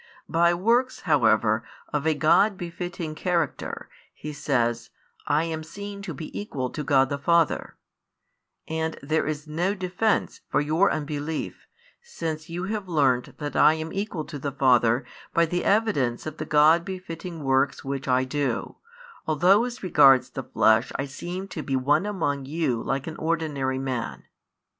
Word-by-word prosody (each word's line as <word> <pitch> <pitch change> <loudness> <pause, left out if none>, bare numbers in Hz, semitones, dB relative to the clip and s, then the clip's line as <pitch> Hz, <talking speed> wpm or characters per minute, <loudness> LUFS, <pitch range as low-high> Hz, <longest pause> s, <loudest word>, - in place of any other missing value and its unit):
By 170 +1 +3
works 235 +8 +1
however 115 -7 +3 0.3
of 150 +1 0
a 160 - +3
God 195 +7 +4
befitting 175 -2 -5
character, 170 -2 -2 0.3
He 150 0 -7
says, 120 -5 0 0.4
I 150 +2 +2
am 160 -1 -3
seen 200 +5 -8
to 195 -3 -6
be 155 - -8
equal 130 -11 -4
to 150 - -4
God 135 -2 +3
the 140 - -3
Father: 170 +1 +1 0.9
and 160 0 -2
there 155 +2 0
is 150 0 -3
no 170 +6 -1
defence 190 +3 -1
for - - +2
your 155 +7 +2
unbelief 150 +1 -4 0.3
since 160 - -5
you 175 +2 -4
have 205 0 -3
learnt 135 -6 +1
that 145 -1 -5
I 155 - +6
am 160 0 -5
equal 195 -6 -3
to 150 -3 -7
the 140 +1 -3
Father 125 -2 +3 0.3
by 170 - +5
the 175 +2 -2
evidence 195 - +1
of 155 0 -6
the 155 - -4
God 155 +3 +5
befitting 175 -3 -7
works 135 +1 +1
which 135 0 -4
I 130 0 +3
do, 130 -2 -2 0.5
although 180 +8 +4
as 245 -3 -7
regards 140 -7 +5
the - - -4
flesh 110 +2 +3
I 135 - -1
seemed 175 +7 -6
to 160 - -4
be 135 -2 -2
one 145 +9 +2
among 145 -9 -2
you 140 -5 -1
like 135 0 -2
an 160 - -6
ordinary 150 -5 -1
man. 130 -3 -4
155 Hz, 160 wpm, -25 LUFS, 135-175 Hz, 0.9 s, I